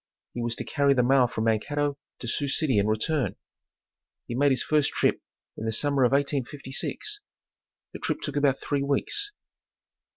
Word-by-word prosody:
He 120 Hz, -, -4 dB
was 120 Hz, 0 st, -1 dB
to -, -, -5 dB
carry 140 Hz, -1 st, +2 dB
the 125 Hz, -, +3 dB
mail 130 Hz, 0 st, +5 dB
from 110 Hz, -1 st, -3 dB
Mankato 145 Hz, +6 st, 0 dB, 0.2 s
to 120 Hz, -, -7 dB
Sioux 140 Hz, +4 st, -1 dB
City 135 Hz, -5 st, +2 dB
and 100 Hz, +1 st, +1 dB
return. 130 Hz, +6 st, 0 dB, 0.9 s
He -, -, -5 dB
made 140 Hz, +4 st, +3 dB
his 130 Hz, -, +1 dB
first 150 Hz, -2 st, +2 dB
trip -, -, +1 dB, 0.3 s
in 110 Hz, -, -6 dB
the 110 Hz, -, 0 dB
summer 140 Hz, +4 st, +2 dB
of 120 Hz, -, +2 dB
1856. 140 Hz, -, -2 dB, 0.7 s
The -, -, -7 dB
trip -, -, -2 dB
took -, -, -4 dB
about 140 Hz, -2 st, +2 dB
three 145 Hz, -1 st, -1 dB
weeks. 145 Hz, -, 0 dB
140 Hz, 170 wpm, -27 LUFS, 120-145 Hz, 0.9 s, mail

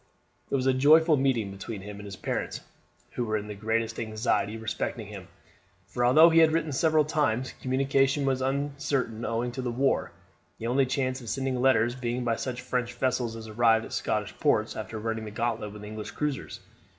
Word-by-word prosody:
It -, -, 0 dB
was 130 Hz, -1 st, 0 dB
a 130 Hz, -, +4 dB
joyful 155 Hz, +4 st, +6 dB
meeting 130 Hz, -7 st, +1 dB
between 100 Hz, +1 st, -7 dB
him 100 Hz, +1 st, -8 dB
and 105 Hz, -, -9 dB
his 100 Hz, -2 st, -7 dB
parents, -, -, -3 dB, 0.5 s
who 125 Hz, -, -2 dB
were 110 Hz, -2 st, 0 dB
in 105 Hz, -, -5 dB
the 105 Hz, -, -6 dB
greatest 110 Hz, +2 st, -1 dB
anxiety 110 Hz, -1 st, -1 dB
respecting 110 Hz, -1 st, -3 dB
him, -, -, -9 dB, 0.6 s
for 110 Hz, +6 st, -3 dB
although 155 Hz, +7 st, +7 dB
he 165 Hz, -, +6 dB
had 160 Hz, -1 st, +6 dB
written 160 Hz, -1 st, 0 dB
several 155 Hz, +2 st, +3 dB
times, 130 Hz, -5 st, 0 dB
communication 135 Hz, +2 st, +2 dB
was 130 Hz, -1 st, +1 dB
uncertain 135 Hz, -3 st, -1 dB
owing 115 Hz, +2 st, -1 dB
to 130 Hz, -, -5 dB
the 125 Hz, -, -2 dB
war, 130 Hz, +3 st, +1 dB, 0.5 s
the 115 Hz, -, -7 dB
only 130 Hz, +3 st, +2 dB
chance 130 Hz, -1 st, -1 dB
of 115 Hz, -, -7 dB
sending 130 Hz, -2 st, -1 dB
letters 120 Hz, -3 st, +3 dB
being 125 Hz, -1 st, -3 dB
by 115 Hz, -1 st, +1 dB
such 120 Hz, 0 st, -4 dB
French 125 Hz, -1 st, -2 dB
vessels 125 Hz, -2 st, 0 dB
as 110 Hz, -1 st, -8 dB
arrived 115 Hz, 0 st, +3 dB
at -, -, -9 dB
Scottish -, -, -2 dB
ports -, -, +2 dB
after 110 Hz, -, -5 dB
running 110 Hz, 0 st, -3 dB
the -, -, -5 dB
gauntlet 110 Hz, -1 st, -2 dB
with 105 Hz, 0 st, -10 dB
English 105 Hz, 0 st, -6 dB
cruisers. 150 Hz, -2 st, -4 dB
125 Hz, 195 wpm, -28 LUFS, 110-135 Hz, 0.6 s, although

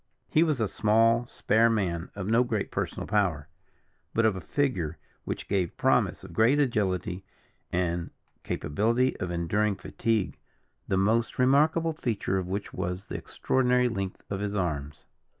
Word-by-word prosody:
He 155 Hz, -, +4 dB
was 155 Hz, -5 st, +2 dB
a 110 Hz, -, +1 dB
small, 115 Hz, +3 st, +3 dB
spare 115 Hz, 0 st, +3 dB
man, 90 Hz, -6 st, -1 dB
of 100 Hz, -2 st, -4 dB
no 115 Hz, +4 st, +4 dB
great 110 Hz, -5 st, -2 dB
personal -, -, -3 dB
power, 90 Hz, -8 st, 0 dB, 0.7 s
but 115 Hz, -, +3 dB
of 110 Hz, -3 st, +3 dB
a 95 Hz, -, -5 dB
figure 85 Hz, -, -1 dB, 0.3 s
which -, -, -4 dB
gave 95 Hz, -4 st, -1 dB
promise -, -, +2 dB
of 85 Hz, -, -10 dB
great 115 Hz, -, +4 dB
agility 95 Hz, -, 0 dB, 0.5 s
and 85 Hz, -1 st, -1 dB, 0.3 s
capability 115 Hz, -, 0 dB
of 90 Hz, -, -3 dB
enduring 100 Hz, +5 st, 0 dB
fatigue, 110 Hz, 0 st, -1 dB, 0.5 s
the 95 Hz, -, +1 dB
most 110 Hz, +4 st, +1 dB
remarkable 155 Hz, +5 st, +3 dB
feature 110 Hz, -9 st, -1 dB
of 90 Hz, -, -4 dB
which 100 Hz, +2 st, -4 dB
was 90 Hz, +2 st, -3 dB
the -, -, -7 dB
extraordinary 125 Hz, -1 st, +1 dB
length 100 Hz, -4 st, -4 dB
of 100 Hz, -, -2 dB
his 105 Hz, 0 st, -2 dB
arms. 75 Hz, -6 st, -3 dB
105 Hz, 150 wpm, -28 LUFS, 90-115 Hz, 0.7 s, He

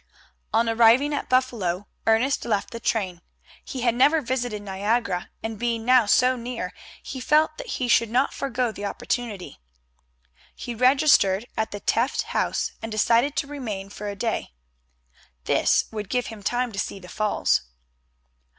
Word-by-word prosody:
On 230 Hz, +1 st, +2 dB
arriving 235 Hz, +6 st, +4 dB
at 290 Hz, -, -3 dB
Buffalo 215 Hz, -8 st, 0 dB, 0.2 s
Ernest 235 Hz, +6 st, +2 dB
left 210 Hz, -1 st, -1 dB
the 230 Hz, -, -6 dB
train. 190 Hz, -7 st, -1 dB, 0.4 s
He 260 Hz, -, -6 dB
had 235 Hz, -1 st, +2 dB
never 290 Hz, +6 st, +4 dB
visited 245 Hz, -5 st, -3 dB
Niagara, 200 Hz, 0 st, -1 dB
and 225 Hz, -2 st, -4 dB
being 235 Hz, -2 st, -1 dB
now 250 Hz, -3 st, +5 dB
so 250 Hz, +4 st, +4 dB
near 235 Hz, -6 st, -5 dB, 0.3 s
he 260 Hz, -, -6 dB
felt 310 Hz, +4 st, +3 dB
that -, -, -7 dB
he 255 Hz, -, -1 dB
could 230 Hz, -1 st, +3 dB
not 255 Hz, +4 st, +1 dB
forego 250 Hz, -3 st, -1 dB
the 205 Hz, -, -9 dB
opportunity. 205 Hz, -, -4 dB, 1.0 s
He 240 Hz, -, -6 dB
registered 250 Hz, -5 st, +4 dB
at 220 Hz, 0 st, -1 dB
the 205 Hz, -, -7 dB
Tefft 235 Hz, +5 st, +1 dB
House, -, -, -1 dB
and 225 Hz, -, -6 dB
decided 235 Hz, +6 st, +2 dB
to -, -, 0 dB
remain 220 Hz, -9 st, -5 dB
for 205 Hz, 0 st, -6 dB
a 200 Hz, -, -5 dB
day. 225 Hz, -, -3 dB, 0.9 s
This -, -, +2 dB
would 210 Hz, -3 st, -5 dB
give 250 Hz, -1 st, 0 dB
him 215 Hz, -, -11 dB
time 245 Hz, +4 st, -1 dB
to 195 Hz, -, -5 dB
see 195 Hz, -, -3 dB
the 185 Hz, -2 st, -12 dB
Falls. 210 Hz, -, +1 dB
230 Hz, 160 wpm, -24 LUFS, 205-255 Hz, 1.0 s, now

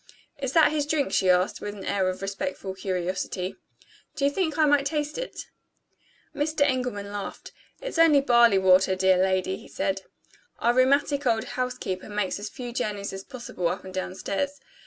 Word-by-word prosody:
"Is 270 Hz, -1 st, -3 dB
that 320 Hz, -2 st, +6 dB
his 295 Hz, -2 st, -1 dB
drink?" 295 Hz, -2 st, 0 dB
she 190 Hz, -, +3 dB
asked, 180 Hz, +1 st, +2 dB
with 205 Hz, 0 st, -5 dB
an 195 Hz, -, -8 dB
air 190 Hz, -2 st, +1 dB
of 185 Hz, +1 st, -5 dB
respectful 200 Hz, -1 st, -4 dB
curiosity. 185 Hz, 0 st, -3 dB, 0.6 s
"Do 275 Hz, -, 0 dB
you 280 Hz, -, +3 dB
think 320 Hz, -2 st, -1 dB
I 310 Hz, -, +5 dB
might 285 Hz, -1 st, +3 dB
taste 300 Hz, -, -2 dB
it?" -, -, -6 dB, 0.9 s
Mr. 300 Hz, +1 st, -1 dB
Engelman 250 Hz, -7 st, 0 dB
laughed. 205 Hz, -1 st, -6 dB, 0.3 s
"It's -, -, -4 dB
only 320 Hz, -3 st, +7 dB
barley 235 Hz, -6 st, +5 dB
water, 190 Hz, 0 st, +5 dB
dear 185 Hz, 0 st, +3 dB
lady," 190 Hz, 0 st, +1 dB
he -, -, -14 dB
said. 195 Hz, 0 st, -2 dB, 0.6 s
"Our 235 Hz, -, +2 dB
rheumatic 275 Hz, +2 st, +3 dB
old 225 Hz, -2 st, +2 dB
housekeeper 250 Hz, -7 st, -4 dB
makes 205 Hz, -2 st, -1 dB
as 210 Hz, +1 st, -5 dB
few 245 Hz, 0 st, -7 dB
journeys 210 Hz, -5 st, -3 dB
as 195 Hz, 0 st, -6 dB
possible 235 Hz, -8 st, -4 dB
up 180 Hz, -, -3 dB
and 185 Hz, -, -9 dB
down 185 Hz, 0 st, -3 dB
stairs. 280 Hz, +10 st, -3 dB
215 Hz, 180 wpm, -26 LUFS, 190-280 Hz, 0.9 s, only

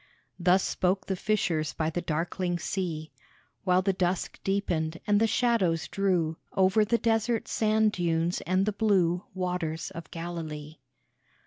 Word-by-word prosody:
Thus 180 Hz, +2 st, +4 dB
spoke 190 Hz, +1 st, 0 dB
the 190 Hz, -, -1 dB
fishers 170 Hz, -8 st, 0 dB
by 160 Hz, 0 st, -1 dB
the 175 Hz, -, -2 dB
darkling 175 Hz, +2 st, -1 dB
sea, 170 Hz, -3 st, -3 dB, 0.5 s
While 185 Hz, 0 st, +3 dB
the 195 Hz, 0 st, +2 dB
dusk 180 Hz, 0 st, -1 dB
deepened, 170 Hz, -5 st, -1 dB
and 205 Hz, -1 st, +3 dB
the 225 Hz, -, +3 dB
shadows 220 Hz, -8 st, +1 dB
drew 180 Hz, -5 st, 0 dB, 0.2 s
Over 190 Hz, +3 st, +4 dB
the 235 Hz, +3 st, +2 dB
desert 225 Hz, 0 st, +1 dB
sand 215 Hz, 0 st, +2 dB
dunes 170 Hz, -2 st, 0 dB
and 185 Hz, +2 st, +2 dB
the 215 Hz, -, 0 dB
blue 190 Hz, -4 st, +2 dB
Waters 180 Hz, -3 st, -2 dB
of 165 Hz, 0 st, -8 dB
Galilee. 160 Hz, -3 st, -6 dB
180 Hz, 140 wpm, -28 LUFS, 165-200 Hz, 0.5 s, Thus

